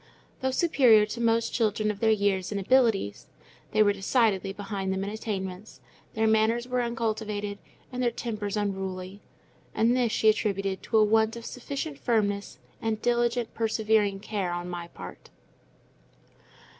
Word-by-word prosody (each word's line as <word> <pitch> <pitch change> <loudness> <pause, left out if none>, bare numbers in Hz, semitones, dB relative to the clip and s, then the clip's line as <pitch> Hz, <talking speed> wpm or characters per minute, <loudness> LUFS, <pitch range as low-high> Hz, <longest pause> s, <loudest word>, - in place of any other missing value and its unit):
Though 260 - 0
superior 255 -7 +5
to 230 +3 -6
most 230 0 +1
children 215 -2 +1
of 205 - -9
their 225 - +3
years 200 -3 +1
in 205 - -2
abilities, 215 - +2 0.4
they 215 0 +4
were 205 -1 +3
decidedly 195 -1 +1
behind 195 -1 -4
them 190 0 -1
in 200 - -3
attainments; 200 -2 -5 0.4
their 220 0 +1
manners 220 +2 +2
were 250 0 0
uncultivated, 215 -3 -2 0.3
and 250 0 -3
their 245 - +3
tempers 215 -3 -4
unruly. 190 -1 -3 0.5
And 230 +3 +3
this 245 -3 +1
she 220 - +1
attributed 195 -3 +1
to 225 - 0
a 215 - +6
want 220 +1 +3
of 235 0 -8
sufficient 280 +3 -5
firmness, 205 -4 0 0.2
and 220 -1 -1
diligent, 240 0 0
persevering 215 -3 +1
care 200 -4 -2
on 175 0 -4
my 175 -1 -5
part. - - -11
215 Hz, 150 wpm, -27 LUFS, 200-230 Hz, 0.5 s, a